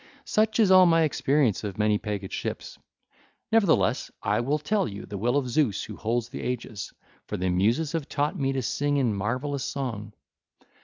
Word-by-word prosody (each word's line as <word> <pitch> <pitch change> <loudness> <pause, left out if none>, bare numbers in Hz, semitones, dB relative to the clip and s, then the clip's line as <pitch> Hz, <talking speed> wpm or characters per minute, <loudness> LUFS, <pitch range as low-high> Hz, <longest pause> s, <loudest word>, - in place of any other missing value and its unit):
Such 220 +1 +1
is 205 -4 +5
all 185 -1 +8
my 165 -1 +4
experience 140 -7 +1
of 100 -3 -5
many 105 -1 +2
pegged 100 -3 -4
ships; - - -5 0.7
nevertheless 210 -7 +3
I 105 +2 +1
will 135 +6 +1
tell 195 +7 0
you 100 -1 -7
the 105 - -8
will 120 +6 +1
of 135 -3 0
Zeus 125 -6 +1
who - - -8
holds 115 +1 -2
the - - -6
aegis; 115 -4 -4 0.4
for - - -3
the 90 +1 -1
Muses 115 - +1
have 160 -4 -3
taught 145 +5 -1
me 135 -6 0
to 135 -1 -2
sing 145 +4 0
in 125 -6 +1
marvellous 130 +8 -2
song. 115 -6 -4
130 Hz, 185 wpm, -26 LUFS, 105-150 Hz, 0.7 s, all